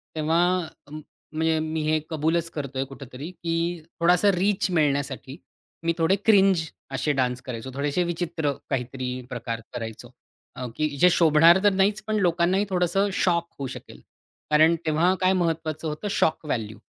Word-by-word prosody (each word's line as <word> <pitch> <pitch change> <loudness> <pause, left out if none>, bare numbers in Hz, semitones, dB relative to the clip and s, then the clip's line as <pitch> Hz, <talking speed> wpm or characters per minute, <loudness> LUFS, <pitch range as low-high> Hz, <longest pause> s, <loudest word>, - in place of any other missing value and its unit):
तेव्हा 160 +2 +2 0.5
अ, - - -17
म्हणजे 155 +1 -3
मी 155 0 -2
हे 155 +1 +2
कबूलच 165 +1 0
करतोय 140 -3 -3
कुठेतरी 135 +2 -9
की 165 -2 -4 0.5
थोडासा 180 +4 +4
रीच 190 +1 +1
मिळण्यासाठी, 140 -4 -1 0.5
मी 165 0 +1
थोडे 165 +3 +3
क्रिंज 195 -5 +5 0.3
अशे 135 +3 0
डान्स 125 -2 -1
करायचो. 125 +1 -7
थोडेशे 145 +6 0
विचित्र, 165 -3 -2 0.2
काहीतरी 130 -1 -3 0.2
प्रकार 115 -2 -4
करायचो. 115 -3 -7 0.4
अ, 125 0 -5
की 155 0 0
जे 180 +5 +6
शोभणार 165 +1 +6
तर 205 - +4
नाहीच 200 +2 +2
पण 215 - 0
लोकांनाही 180 +2 +2
थोडंसं 185 +2 +1
शॉक 170 -3 +1
होऊ 135 - -3
शकेल. - - -10 0.5
कारण 155 +2 +5
तेव्हा 160 +4 +3
काय 185 0 +4
महत्वाचं 165 -3 -1
होतं? 150 +7 -4
Shock 160 - +1
value 110 -7 -3
160 Hz, 150 wpm, -25 LUFS, 140-175 Hz, 0.5 s, जे